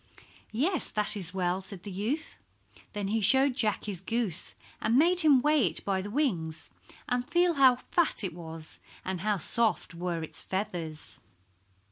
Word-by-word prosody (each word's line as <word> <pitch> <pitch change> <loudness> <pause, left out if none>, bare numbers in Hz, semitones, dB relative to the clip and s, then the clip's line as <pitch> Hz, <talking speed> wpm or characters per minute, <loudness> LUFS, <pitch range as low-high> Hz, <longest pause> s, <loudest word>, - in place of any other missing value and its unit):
"Yes, 310 - 0
that 210 0 0
is 180 -4 +5
well," 185 0 -1
said 190 -1 -7
the 205 - -7
youth. 230 - -3 0.5
Then 205 -1 -3
he 220 +1 0
showed 265 +6 +5
Jack 215 -6 0
his 195 -5 -3
goose, 210 -4 -1 0.3
and 225 +3 +2
made 345 +5 +4
him 290 -6 +5
weigh 300 -7 +4
it - - -3
by 195 -1 0
the 205 - -6
wings 180 - -2 0.4
and 245 0 0
feel 350 0 +3
how 265 -4 +6
fat 310 +1 0
it 190 - -3
was, 160 -2 -9 0.3
and 185 -2 -3
how 210 0 +1
soft 225 +2 0
were 170 -1 -3
its 160 - -1
feathers. 170 -5 -5
210 Hz, 165 wpm, -29 LUFS, 180-265 Hz, 0.5 s, how